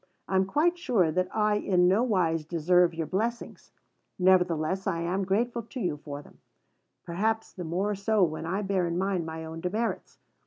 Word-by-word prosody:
I 190 - -2
am 190 0 +4
quite 340 - +1
sure 210 - +2
that 185 +3 0
I 210 -1 +2
in 180 -3 +2
no 195 +5 +4
wise 180 -9 +1
deserve 170 +2 +2
your 165 -1 -2
blessings; 225 +8 -3 0.5
nevertheless 180 -1 +2
I 170 -3 0
am 180 +3 -1
grateful 235 +5 0
to 230 +3 -9
you 175 -9 -1
for 145 0 -8
them, - - -19 0.6
perhaps 220 +6 -1
the 180 - -6
more 185 +6 -1
so 205 +1 +1
when 160 -1 -1
I 195 +4 -1
bear 190 -3 0
in 170 0 -2
mind 185 -3 -1
my 160 0 -6
own 160 +1 -7
demerits. 215 +7 -3
185 Hz, 185 wpm, -28 LUFS, 170-210 Hz, 0.6 s, am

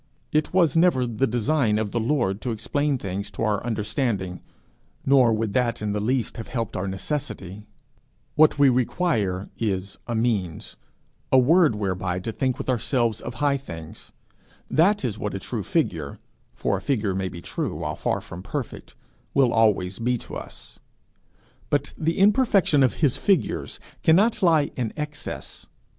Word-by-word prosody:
It 155 0 +1
was 170 -5 +3
never 165 -7 +4
the 120 +3 0
design 120 0 +1
of 110 -2 -2
the 120 - 0
Lord 115 -5 0
to 125 - -3
explain 140 +6 0
things 100 -1 -4
to 100 +3 -5
our 105 -2 0
understanding 105 -4 -2 0.6
nor 130 -3 +5
would 110 -2 -1
that 120 -1 +1
in 105 -1 -2
the 105 - -1
least 120 +2 -1
have 115 - -6
helped 115 -4 -3
our 95 +1 -2
necessity; 105 - -5 0.7
what 155 -1 +5
we 140 -1 +6
require 120 - 0
is 95 -3 -2
a 120 - -2
means, 105 -8 -1 0.6
a 130 - +6
word, 150 - +5
whereby 95 -3 -2
to 105 +5 -4
think 130 +2 -1
with - - -6
ourselves 120 -2 0
of - - -6
high 145 -1 +1
things: 80 - -10 0.6
that 185 +1 +3
is 110 -3 -3
what 105 -2 -3
a - - -3
true - - -4
figure, - - -1 0.3
for 100 - -1
a - - -7
figure 110 -8 0
may 95 0 -2
be 85 - -8
true 85 - -4
while 75 -1 -3
far - - -1
from 85 - -9
perfect, 125 +5 -6 0.4
will 130 -3 +4
always 100 -4 +2
be 125 +2 +1
to - - -10
us. - - -9 0.9
But 145 0 0
the 165 +1 -1
imperfection 200 - +4
of 130 - +3
his 130 - +1
figures 195 -6 0 0.2
cannot 210 +7 +4
lie 160 -5 +3
in 120 -4 -2
excess. 150 -1 -6
120 Hz, 165 wpm, -24 LUFS, 100-145 Hz, 0.9 s, we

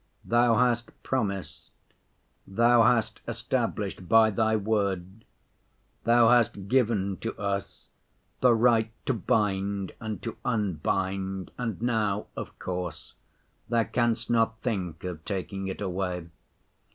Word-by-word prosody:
Thou 120 0 +4
hast 120 0 +2
promised, 100 -7 -3 0.8
Thou 115 +4 +4
hast 115 0 +2
established 90 - -2
by 110 -1 +6
Thy 110 +1 +2
word, 100 -1 -1 0.8
Thou 115 0 +6
hast 115 -5 +3
given 105 -6 +1
to 115 - -5
us 100 -1 -4 0.5
the 125 -2 +5
right 115 -1 +3
to 135 - +1
bind 100 -3 0
and 110 -2 -4
to 115 - -5
unbind, 95 -2 -1
and 115 -6 -3
now, 105 -4 0
of - - -7
course, 90 -3 -5 0.6
Thou 115 -1 +3
canst 120 -1 0
not 115 -1 +2
think 90 -9 -3
of 90 -4 -5
taking 95 -1 -4
it 95 - -5
away. 90 -2 -2
105 Hz, 115 wpm, -27 LUFS, 95-115 Hz, 0.8 s, by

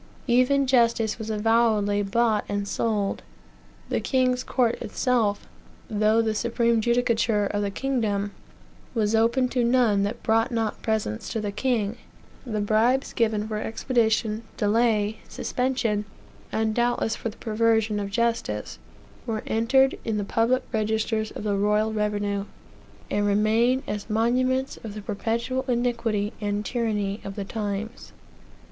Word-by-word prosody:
Even 255 +3 +3
justice 235 -4 +2
was 220 0 -5
avowedly 215 -2 +2
bought 215 +2 +1
and 205 0 -2
sold; 210 -2 -1 0.7
the - - 0
king's 255 -1 +1
court 240 -3 0
itself, 230 -6 0 0.5
though 215 +2 +3
the 220 -1 0
supreme 235 +1 +1
judicature 230 -3 +2
of 205 +1 -1
the 200 - 0
kingdom, 205 -4 -1 0.6
was 215 -1 +1
open 235 +3 +3
to 250 -1 0
none 235 -4 +3
that 205 +4 -3
brought 225 +2 +2
not 225 -2 -2
presents 215 - -2
to 225 - -2
the 205 -1 -3
king; 225 -1 -1 0.5
the 215 -3 -1
bribes 225 +6 +2
given 220 -2 +1
for 215 -1 -3
expedition, 220 -1 0 0.2
delay, 215 0 +2
suspension, 250 -5 -1 0.5
and 220 0 0
doubtless 240 -1 +1
for 230 - -4
the 215 - -13
perversion 220 -1 +1
of 200 -1 -3
justice, 235 +2 -1 0.5
were 220 -2 -2
entered 265 +4 +2
in 220 -2 -1
the 205 - -1
public 235 +5 +1
registers 220 0 0
of - - -8
the 205 -1 0
royal 210 +2 +1
revenue, 205 -1 -1 0.7
and 205 0 +1
remain 225 +6 +2
as 210 +1 -5
monuments 255 +4 +1
of 215 -2 -8
the 210 - -6
perpetual 230 +5 -2
iniquity 235 -4 0
and 205 0 -2
tyranny 210 -4 -1
of 195 - -6
the 200 - -4
times. 210 +2 -5
220 Hz, 140 wpm, -25 LUFS, 210-235 Hz, 0.7 s, Even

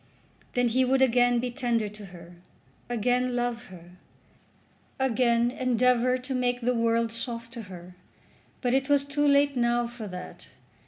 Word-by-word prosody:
Then 245 -1 +2
he 255 +3 +2
would 265 +1 +3
again 245 -1 +3
be 245 +1 -2
tender 240 -4 -1
to 210 0 -10
her, 175 -1 -13 0.6
again 245 +2 0
love 240 -1 -2
her, 180 -2 -14 1.0
again 240 -2 +2
endeavour 250 0 +2
to 255 +1 -6
make 245 -1 0
the 250 +1 +1
world 230 -1 +1
soft 230 0 -5
to 235 - -6
her. 180 0 -11 0.7
But 245 -1 0
it 270 +1 +1
was 285 -1 +4
too 290 +1 0
late 280 0 +3
now 240 0 +1
for 235 -2 -8
that. 180 -1 -9
245 Hz, 155 wpm, -27 LUFS, 230-255 Hz, 1.0 s, was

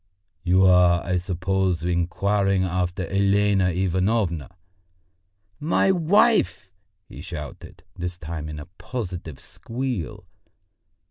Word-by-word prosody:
"You 95 +1 +4
are, 90 -2 +5
I 90 -1 0
suppose, 90 -1 -1
inquiring 95 +3 +1
after 90 0 -1
Elena 100 0 +2
Ivanovna?" 95 -1 0 1.1
"My 165 +5 +2
wife?" 190 - +2 0.4
he - - -10
shouted, 80 -7 -8
this 90 0 -5
time 80 -2 -6
in 75 - -6
a 75 - -7
positive 90 - -6
squeal. 120 - -5
95 Hz, 95 wpm, -24 LUFS, 85-100 Hz, 1.1 s, are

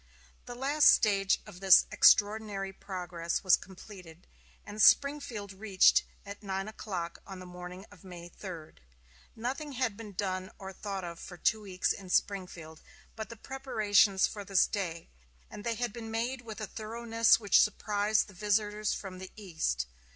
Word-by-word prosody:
The 245 - -7
last 285 +4 +3
stage 195 -2 +3
of 175 - -12
this 190 -2 +7
extraordinary 205 -2 +3
progress 175 -3 -4
was 185 -2 +6
completed, 180 -3 -13 0.4
and 210 +1 -5
Springfield 255 -7 +3
reached 195 -1 +3 0.2
at 200 +1 -9
nine 195 -1 -4
o'clock 185 -6 -5
on 195 -1 -8
the 185 - -10
morning 180 +1 -9
of 195 -4 -17
May 175 -2 -10
3. 170 -4 -9 0.6
Nothing 270 +6 -4
had 250 -5 -1
been 210 -1 -10
done 185 -1 -3
or 190 -1 -8
thought 195 0 -5
of 170 -1 -7
for 180 - -10
two 220 +5 +1
weeks 190 -3 -1
in 190 -2 -11
Springfield 180 -5 -2 0.3
but 220 -1 -6
the 230 - -8
preparations 215 -7 +2
for 205 - -5
this 195 -2 +3
day, 170 -5 -4 0.4
and 205 - -9
they 230 0 -1
had 240 -2 -3
been 225 -1 -7
made 240 +3 -2
with 225 -2 -9
a 215 - -3
thoroughness 230 +2 +1
which 205 -4 +5
surprised 210 0 +1
the 205 - -14
visitors 210 +2 0
from 185 -2 -8
the 190 0 -8
East. 160 - -2
200 Hz, 160 wpm, -30 LUFS, 185-220 Hz, 0.6 s, this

